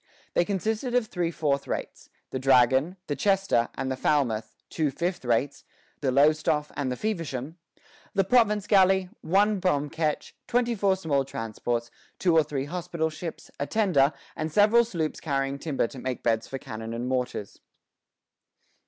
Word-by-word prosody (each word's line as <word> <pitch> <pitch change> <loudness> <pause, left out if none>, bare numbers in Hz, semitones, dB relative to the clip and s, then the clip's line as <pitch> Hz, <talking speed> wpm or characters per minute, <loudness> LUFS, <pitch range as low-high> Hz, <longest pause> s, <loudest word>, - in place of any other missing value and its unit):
They 175 - +3
consisted 220 +5 -1
of 250 -2 +3
three 180 -5 -2
fourth 145 -4 -1
rates, - - -5 0.2
the 130 - -2
"Dragon," 130 +6 +4
the 145 - -2
"Chester," 195 - +2
and 130 - -2
the - - -1
"Falmouth;" 120 -6 0 0.2
two 155 -3 +1
fifth 175 +5 -3
rates, 125 +3 0 0.4
the 135 -3 0
"Lowestoffe" 150 +2 +3
and 135 -3 -1
the - - -1
"Feversham;" 165 - -4 0.6
the 195 - +4
province 210 -1 +3
galley, 190 -2 +4
one 200 +4 +2
bomb 150 -6 0
ketch, 160 -2 -2
twenty 240 0 +1
four 200 -3 +2
small 155 -7 0
transports, 120 -1 -3 0.3
two 175 -3 +2
or 160 - +7
three 140 -2 -3
hospital 170 0 -2
ships, 165 +1 -7
a 140 - -1
tender, 175 -11 +3 0.2
and 155 +1 -3
several 215 +6 +5
sloops 165 -8 -3
carrying 140 -2 -1
timber 145 -4 0
to 130 - -9
make 130 0 -4
beds 115 -1 +1
for 135 - -5
cannon 110 -2 -6
and 120 +2 -3
mortars. 125 -5 -3
155 Hz, 160 wpm, -27 LUFS, 135-190 Hz, 0.6 s, or